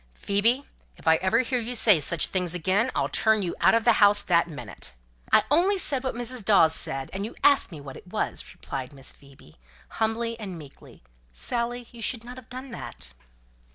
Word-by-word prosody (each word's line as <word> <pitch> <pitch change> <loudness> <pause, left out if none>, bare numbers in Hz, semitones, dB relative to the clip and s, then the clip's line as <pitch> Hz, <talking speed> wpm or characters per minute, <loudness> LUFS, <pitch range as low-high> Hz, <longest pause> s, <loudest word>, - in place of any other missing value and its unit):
"Phoebe, 225 - +2 0.3
if - - -14
ever 190 +7 +3
I - - -3
hear 250 0 -1
you 240 +2 -3
say 215 -6 +5
such 155 +2 +2
things 180 -2 -2
again, 190 +8 +1
I'll - - +1
turn 220 -2 +2
you 175 - -3
out - - +5
of 230 - +2
the 235 +1 +5
house 205 0 +6
that 170 -3 +2
minute." 125 - -9 0.4
"I - - +6
only 365 +6 +3
said 275 -7 0
what 260 - -3
Mrs. 245 -1 -3
Dawes 190 -6 +5
said, 135 -3 -3
and 195 +1 -3
you 220 - -6
asked 280 -7 +5
me 160 - -8
what 140 -2 -10
it - - -13
was," 210 +4 -2
replied 135 0 -7
Miss 135 -1 -6
Phoebe, 135 - -19 0.4
humbly 230 +1 -1
and 190 -5 -6
meekly. 145 - -14 0.4
"Dorothy, 240 0 -2
you 235 - -12
should 230 +1 -2
not 245 +2 -10
have 255 - -13
done 255 +1 -8
that." 65 - -8
210 Hz, 200 wpm, -26 LUFS, 165-240 Hz, 0.4 s, house